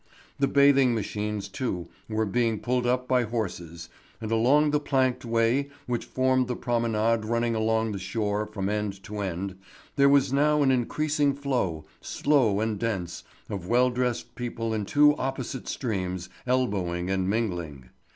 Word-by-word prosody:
The 140 - +3
bathing 140 -3 +5
machines 105 -1 -3
too 95 -5 -3 0.2
were 110 0 0
being 115 +1 0
pulled 125 0 0
up 125 +1 0
by 130 -1 +3
horses, 90 -8 -4 0.3
and 110 -1 -5
along 140 +7 +4
the 150 - +2
planked 130 -3 0
way 115 +4 +1 0.2
which 120 -1 -2
formed 130 -1 +1
the 125 - -2
promenade 115 -2 0
running 115 +1 0
along 110 0 +1
the 100 - -4
shore 105 +2 -2
from 100 -3 -4
end 105 -2 -2
to 105 0 -6
end, 95 0 -4 0.4
there 140 0 +6
was 140 -1 +3
now 150 +1 +3
an 135 - +4
increasing 145 +3 +1
flow, 120 - -2 0.2
slow 125 -9 +2
and 110 -2 -1
dense, 95 -7 -3 0.2
of 95 -4 -5
well 125 +3 +3
dressed 125 -1 -2
people 115 -2 -3
in 105 -2 -2
two 150 +6 +5
opposite 130 -1 -4
streams 90 -6 -3 0.2
elbowing 95 -8 0
and 95 -1 0
mingling. 85 - -3
115 Hz, 155 wpm, -27 LUFS, 100-130 Hz, 0.4 s, there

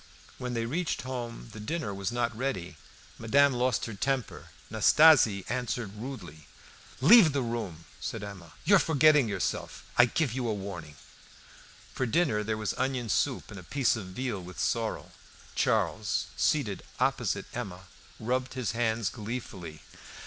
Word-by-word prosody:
When 125 -1 -3
they 115 0 -1
reached 165 +7 -2
home 120 - -6
the 110 - -9
dinner 110 0 -3
was 100 +2 -3
not 120 -1 -1
ready. 110 -9 -3 0.4
Madame 140 +5 +4
lost 125 -2 +1
her 115 - -6
temper. 130 +4 -2 0.2
Nastasie 135 - +6
answered 120 -3 -2
rudely. 95 - -8 0.5
"Leave 175 - +8
the 140 -2 0
room!" 110 -9 -4
said - - -4
Emma. 95 -5 -9
"You 200 - +7
are - - +4
forgetting 150 -5 +4
yourself. 100 -3 -3 0.2
I 120 - +10
give 130 0 0
you 130 - -2
warning." 100 -8 -5 1.0
For 130 - -1
dinner 115 -7 +2
there 110 +1 -2
was 110 -1 -2
onion 130 -3 -1
soup - - 0
and 100 - -8
a - - -11
piece 130 +6 +1
of 105 -5 -6
veal 105 +1 -3
with 90 0 -10
sorrel. - - -1 0.4
Charles, - - +1
seated - - +1 0.2
opposite - - 0
Emma, 100 -7 -5 0.4
rubbed 125 +3 -1
his 130 -3 -1
hands 115 -2 0
gleefully. 100 -8 -7
115 Hz, 150 wpm, -29 LUFS, 100-130 Hz, 1.0 s, I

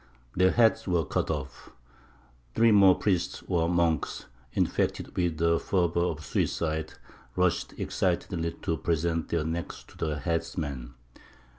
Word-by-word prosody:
Their 90 +1 +5
heads 115 0 +3
were 85 -3 +1
cut - - -1
off. 75 -5 -5 0.9
Three 115 0 +5
more 100 -3 +7
priests 90 -4 -1
or 85 -3 +1
monks, 85 -4 0 0.3
infected - - -1
with 85 -3 0
the 85 +1 +2
fever 85 -3 +1
of 80 -3 -1
suicide, 80 +1 -1 0.4
rushed 90 -2 +1
excitedly 85 -2 -1
to 80 - 0
present 85 0 -1
their 85 -2 0
necks 85 +1 -4
to - - -17
the 75 -2 -2
headsman. 70 -5 -3
85 Hz, 130 wpm, -28 LUFS, 80-90 Hz, 0.9 s, more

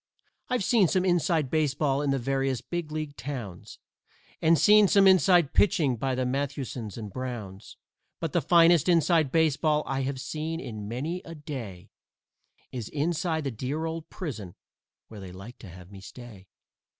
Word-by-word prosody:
I've 250 -5 0
seen 210 -3 +4
some 185 +2 +1
"inside" 170 -5 +1
baseball 145 -2 +1
in 145 - -1
the 135 - +1
various 135 0 -1
big 170 +4 -5
league 155 -2 -5
towns, 115 -8 -7 0.6
And 165 +1 +4
seen 210 +7 +6
some 200 0 +4
"inside" 180 -4 +5
pitching 155 -9 +3
by 130 +3 -2
the 130 0 -1
Mathewsons 130 -4 -4
and 105 -4 -7
Browns, 115 -7 -7 0.4
But 165 -2 -4
the 175 - +2
finest 170 -1 +4
"inside" 165 -4 +3
baseball 155 -1 +2
I 135 0 -2
have 130 0 -3
seen 160 +4 -4
in 110 -8 -7
many 150 +11 -4
a 165 -2 -9
day 130 - -8 0.8
Is 120 -5 -6
inside 160 +1 -1
the 135 - -2
dear 135 +8 -4
old 165 0 -5
prison, 110 - -7 0.5
where 110 - -11
they 95 -2 -9
like 100 +7 -11
to 100 - -11
have 90 +2 -13
me 100 -1 -11
stay. 105 -3 -12
145 Hz, 160 wpm, -27 LUFS, 120-165 Hz, 0.8 s, seen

